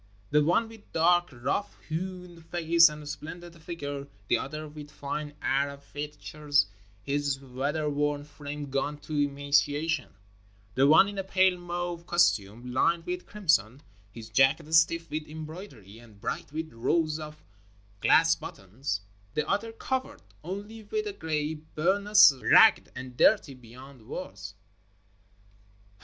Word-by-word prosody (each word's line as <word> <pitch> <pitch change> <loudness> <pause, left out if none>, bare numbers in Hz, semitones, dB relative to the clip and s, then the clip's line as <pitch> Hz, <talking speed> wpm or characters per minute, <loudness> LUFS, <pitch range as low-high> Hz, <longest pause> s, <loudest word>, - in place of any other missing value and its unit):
The 150 0 +4
one 175 +9 +2
with 225 -2 -15
dark, 175 +2 +3
rough 130 +11 -3
hewn 180 +1 -5
face 170 0 +4
and 150 -1 -9
splendid 170 +3 -8
figure, 145 -4 -5 0.2
the - - +4
other 155 +3 -6
with 150 0 -10
fine 145 +1 -5
Arab 140 +1 0
features, 150 -1 -1 0.4
his 140 0 -1
weather 140 +4 -2
worn 145 0 0
frame 145 -1 -7
gaunt 145 +2 -2
to 155 - -7
emaciation 145 0 +1 0.3
— 100 0 -32
the 135 +1 +4
one 160 +6 +7
in 200 -1 -5
a - - -1
pale 190 -1 +3
mauve 175 -1 -5
costume 115 - +2
Hned 165 +6 +2
with 180 0 -4
crimson, 145 - +1 0.3
his 110 +1 -10
jacket 140 +7 +3
stiff 165 +1 +4
with 155 0 -3
embroidery 155 - -9
and 110 -4 -17
bright - - -4
with 160 -1 -5
rows 155 +7 0
of 150 0 -9 0.6
glass - - +5
buttons, 100 +3 -5 0.3
the 150 - 0
other 215 +3 -1
covered 260 +3 -4 0.2
only 205 +6 -6
with 430 - -3
a 415 - -4
gray 155 - -2
bur 160 +5 -1
nous 210 -7 +7
ragged - - +6
and 125 0 -8
dirty 155 - +4
beyond 125 0 -14
words. 100 - -7
150 Hz, 140 wpm, -28 LUFS, 140-170 Hz, 0.6 s, one